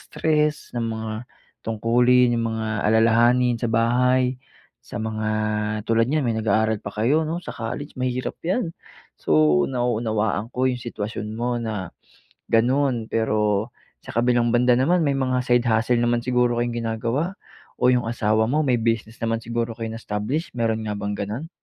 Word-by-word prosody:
stress, 150 -1 -1
ng 120 - -1
mga 110 -1 -4 0.5
tungkulin, 120 +3 +3
yung 115 0 0
mga 110 0 -3 0.2
alalahanin 120 +3 +4
sa 120 - -1
bahay. 125 +3 +2 0.5
Sa - - -7
mga, 110 -1 -2 0.6
tulad 115 +2 +2
niyan 150 -3 +1
may 115 - +1
nag-aaral 110 0 +1
pa 100 - -5
kayo 125 +10 +1
'no 160 +2 -2
sa 175 - -8
college, 120 +6 -5
mahirap 130 0 -2
yan. 175 -1 -1 0.4
So 75 -1 +3
nauunawaan 110 -4 -1
ko 130 +1 0
yung 125 -1 -1
sitwasyon 110 -2 -5
mo 120 +1 -1
na, 105 -6 -4 0.6
ganun. 120 0 +2
Pero 105 -1 +1 0.3
sa - - -14
kabilang 120 0 +2
banda 125 +1 +4
naman 160 +7 +2
may 140 - +2
mga 130 -2 0
side 120 0 +2
hustle 115 +2 +2
naman 120 0 +1
siguro 125 -1 +2
kayong 120 0 -1
ginagawa? 115 - -2 0.4
O 125 0 +4
yung 120 -2 0
asawa 110 -1 +1
mo 150 +2 +1
may 125 -4 +1
business 115 0 -2
naman 115 0 0
siguro 115 0 -3
kayong 115 -1 -4
na-establish 115 +11 -3
meron 110 -1 0
nga 105 -1 -3
bang 100 0 -3
ganun? 110 +11 -4
120 Hz, 160 wpm, -23 LUFS, 110-125 Hz, 0.6 s, alalahanin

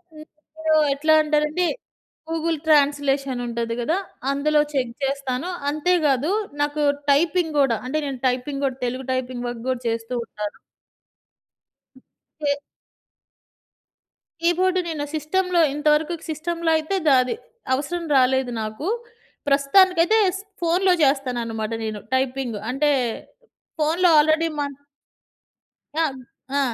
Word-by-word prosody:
ఇంకిప్పుడు 315 +1 -5 0.2
ఎట్లా 310 +3 +2
అంటే‌నండి, 305 +3 +1 0.6
Google 325 0 -1
translation 280 -3 +2
ఉంటది 235 -1 -3
గదా! 320 +9 0 0.3
అందులో 300 +2 +2
చెక్ 250 -4 -1
జేస్తాను. 275 +3 -2 0.2
అంతే 305 +5 +1
కాదు 280 +5 +1 0.3
నాకు 295 +1 0 0.3
టైపింగ్ 320 +2 +2
గూడా. 260 -5 +3
అంటే, 265 +5 -2
నేను 270 -2 -5
టైపింగ్ 260 +3 -2
కూడా 260 -1 -2
తెలుగు 255 +2 -3
టైపింగ్ 250 -1 -3
వర్క్ 240 -1 -6
కూడా 255 -1 -1
చేస్తూ 230 +1 -2
ఉంటాను. 210 -2 -6 1.8
కే 290 -1 +1 1.9
కీబోర్డ్ 365 +2 +2
నేను 300 -3 -3
సిస్టమ్‌లో 360 +3 +1
ఇంతవరకు 300 +2 +2 0.2
సిస్టమ్‌లో 330 +2 -1
అయితే 315 +5 -2
ద - - +7
అది 255 - -2 0.4
అవసరం 335 +6 -2
రాలేదు 260 -1 +3
నాకు. 215 - -5 0.6
ప్రస్తుతానికైతే 350 +8 +4 0.4
ఫోన్‌లో 360 +2 +3
చేస్తాననమాట 240 -5 0
నేను 215 -1 -4 0.2
టైపింగ్. 260 -3 -1
అంటే 285 +4 +2 0.9
ఫోన్‌లో 335 +4 +3
ఆల్రెడీ 315 +2 +3
మన 285 -1 -2 1.3
ఆ! - - +4 0.5
ఆ! - - +3
290 Hz, 110 wpm, -23 LUFS, 255-320 Hz, 1.9 s, ద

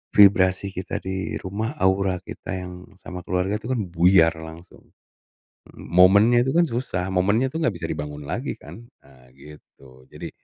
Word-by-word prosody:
vibrasi 95 -1 +5
kita 95 -1 -5
di 95 0 -4
rumah, 110 +7 -4
aura 95 -1 +1
kita 95 - -8
yang 90 -1 -7 0.2
sama 90 -1 -8
keluarga 90 +3 -1
tuh 115 +4 -4
kan 115 - -1
buyar 85 -1 +4
langsung. 80 +2 -12 0.9
Momennya 100 +7 +4
itu 130 - -1
kan 170 0 +3
susah, 115 -7 -3
momennya 100 +7 +1
tuh 160 +3 -3
gak - - +2
bisa 80 - -5
dibangun 75 -1 -5
lagi 120 - -3
kan. 115 - -12 0.2
Nah 65 -2 -21
gitu 70 -2 -17
jadi - - -8
95 Hz, 155 wpm, -23 LUFS, 85-105 Hz, 0.9 s, vibrasi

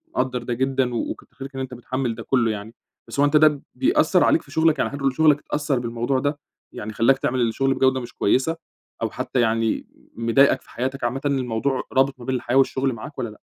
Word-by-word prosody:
مقدّر 125 -2 -1
ده 120 - -2
جدًا، 130 0 0
و - - -1
وكتّر - - -11
خيرك 135 0 -9
إن 135 - -3
أنت 130 -1 -5
متحمّل 125 0 -3
ده 115 - -8
كلّه 120 -4 +2
يعني، 110 +2 -6 0.3
بس - - -6
هو 145 - +6
أنت 145 +1 +4
ده 150 -2 +4
بيأثّر 160 +7 +3
عليك - - +4
في 145 - -18
شغلك 160 -1 +2
يعني - - +1
حد 140 0 -6
من 135 -1 +2
شغلك 150 +1 +4
أتأثّر 145 -3 -1
بالموضوع 120 +3 -1
ده؟ 145 +2 -1 0.3
يعني 110 +1 -6
خلّاك 125 +4 +3
تعمل 130 -1 -1
الشغل 135 +4 +1
بجودة 130 0 +2
مش 120 -1 -8
كويّسة، 135 +10 +1 0.5
أو - - 0
حتّى 130 - -3
يعني 115 -1 0 0.3
مضايقك 115 +5 +3
في - - -23
حياتك 130 +2 -4
عامةً، 125 +3 -1
الموضوع 130 -1 0
رابط 135 0 +2
ما 120 - -10
بين 130 - -1
الحياة 125 0 -2
والشغل 135 -1 +2
معاك 115 +6 -9
والّا 120 -3 -2
لأ؟ 105 - -14
130 Hz, 220 wpm, -23 LUFS, 120-140 Hz, 0.5 s, هو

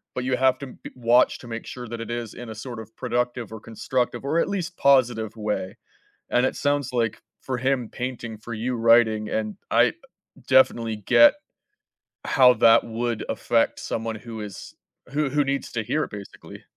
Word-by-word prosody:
but, 125 - -2
you 130 0 0
have 130 0 +3
to 140 - -7
be - - -11
watch 120 0 +3
to 125 - -12
make 115 -1 -6
sure 125 -1 -8
that 115 0 -6
it 115 - -7
is 120 -2 -4
in 120 -1 -9
a 110 - -7
sort 120 +1 -7
of 110 0 -11
productive, 120 -2 -2
or 110 - -7
constructive, 120 +4 -2
or 160 +4 +1
at - - +1
least 180 -3 -3
positive 120 -6 +3
way. 105 -3 -3 0.5
And 125 - +3
it - - -2
sounds, 145 -2 0
like, 115 -3 -1 0.2
for 130 -2 -3
him 130 -2 0
painting, 120 -3 -5
for 110 +2 -7
you 120 +3 -2
writing, 115 -2 +4
and 110 -1 -2
I, - - +5
uh, - - -5 0.5
definitely 115 -4 +3
get 270 - +6 0.9
how 125 -2 +6
that 115 -1 +5
would 115 0 -3
affect 115 +1 +1
someone 115 0 -3
who 110 0 -8
is 105 -3 -9 0.4
who 150 -1 +1
who 145 +2 +2
needs 140 0 -2
to 110 - -2
hear 150 +8 0
it - - -7
basically. 100 -2 -10
120 Hz, 190 wpm, -24 LUFS, 110-130 Hz, 0.9 s, get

